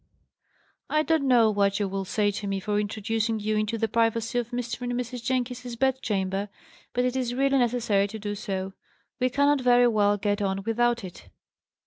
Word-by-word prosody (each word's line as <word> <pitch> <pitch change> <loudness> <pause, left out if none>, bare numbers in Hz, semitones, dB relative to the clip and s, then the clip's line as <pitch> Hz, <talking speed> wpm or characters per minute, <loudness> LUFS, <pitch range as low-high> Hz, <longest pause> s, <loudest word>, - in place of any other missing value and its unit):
I 305 0 +2
don't 315 -3 +1
know 235 -4 +5
what 200 -1 +1
you 205 - 0
will 195 0 -3
say 205 +2 +1
to 205 0 -5
me 195 0 -1
for 205 +1 -1
introducing 220 +2 -1
you 215 +1 -1
into 215 +1 0
the 225 0 0
privacy 230 +2 +1
of 240 -1 -4
Mr. 240 0 -4
and 245 0 -2
Mrs. 245 0 -4
Jenkins's 250 -1 -2
bed 265 +2 +1
chamber, 195 -1 -1 0.4
but 245 0 0
it 250 0 -1
is 245 -2 -1
really 275 +1 +2
necessary 230 -5 +2
to 220 - -7
do 205 -1 -4
so. 195 -2 -4 0.5
We 255 0 +2
cannot 285 +2 +2
very 245 -1 +5
well 205 -3 +3
get 205 0 -1
on 195 0 -1
without 240 +1 +1
it. 180 -2 -10
225 Hz, 190 wpm, -26 LUFS, 205-245 Hz, 0.5 s, know